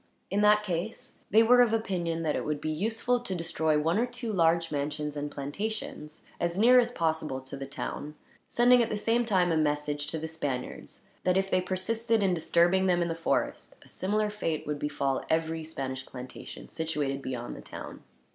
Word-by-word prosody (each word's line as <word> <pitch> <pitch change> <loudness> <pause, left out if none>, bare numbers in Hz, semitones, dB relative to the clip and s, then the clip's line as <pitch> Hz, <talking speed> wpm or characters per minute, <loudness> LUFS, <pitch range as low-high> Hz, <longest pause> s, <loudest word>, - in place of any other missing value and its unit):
In 200 +1 +2
that 210 0 +5
case, 175 -4 -4
they 220 +3 +6
were 245 +2 +6
of 235 -2 +4
opinion 175 -7 -1
that 155 -2 0
it - - -1
would 150 -1 -2
be 155 +1 -2
useful 225 +8 0
to 215 -6 -3
destroy 160 -2 +1
one 165 +6 +1
or 245 - +2
two 240 -2 -4
large 165 -2 +3
mansions 150 +1 -2
and 145 0 -3
plantations, 150 +2 -5 0.2
as 170 +1 -1
near 245 +4 +7
as 240 -1 +2
possible 160 - -1
to 130 +1 -8
the 135 0 -6
town; 145 +2 -5 0.3
sending 245 +1 +5
at 230 - +1
the 210 - -1
same 230 +3 +1
time 185 -5 +2
a 160 - +2
message 150 -1 0
to 160 - -2
the 160 +1 -4
Spaniards 145 -5 -5 0.2
that, 180 0 +3
if 195 0 0
they 185 - +3
persisted 220 +4 0
in 190 -2 +3
disturbing 175 +3 +3
them 175 -1 +3
in 170 - -2
the - - 0
forest, 165 - -1
a - - -19
similar 210 +2 -1
fate 165 -7 -2
would 150 -1 -3
befall 140 -2 -1
every 160 0 0
Spanish 135 -4 -5
plantation 125 -1 -9
situated 150 -4 -2
beyond 125 -3 -5
the - - -9
town. - - -9
165 Hz, 195 wpm, -29 LUFS, 150-210 Hz, 0.3 s, near